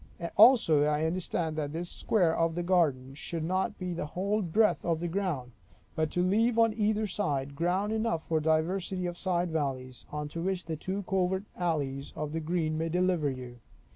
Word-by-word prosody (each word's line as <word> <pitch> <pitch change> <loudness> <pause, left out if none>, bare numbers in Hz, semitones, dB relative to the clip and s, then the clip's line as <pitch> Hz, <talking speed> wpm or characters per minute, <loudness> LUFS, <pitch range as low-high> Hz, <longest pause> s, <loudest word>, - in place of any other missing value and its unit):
Also 220 - +7
I 150 +1 +1
understand, 165 -1 -1
that 145 -1 -2
this 170 +2 -3
square 175 -3 +1
of 165 -1 +1
the 175 - -2
garden, 150 -8 +1
should 160 +3 -5
not 185 +3 -1
be 180 -1 -4
the 165 -3 -4
whole 200 +7 -1
breadth 210 +5 +2
of 165 -2 0
the 175 - -2
ground, 165 -9 -2 0.4
but 155 -1 0
to 175 - 0
leave 225 +5 +2
on 225 -1 +4
either 215 0 +1
side, 145 -9 -2
ground 180 +7 0
enough 220 -7 -1
for 160 -1 +1
diversity 175 +4 0
of 175 -1 -3
side 175 -2 -1
alleys; 130 -4 -3
unto 150 +2 -4
which 185 0 -2
the 160 - -3
two 190 +6 -4
covert 190 0 0
alleys 145 -6 -2
of 150 -1 -4
the 165 - -1
green, 160 -1 -1
may 165 +1 -1
deliver 180 -3 +1
you. 125 -2 -7
170 Hz, 185 wpm, -29 LUFS, 155-190 Hz, 0.4 s, Also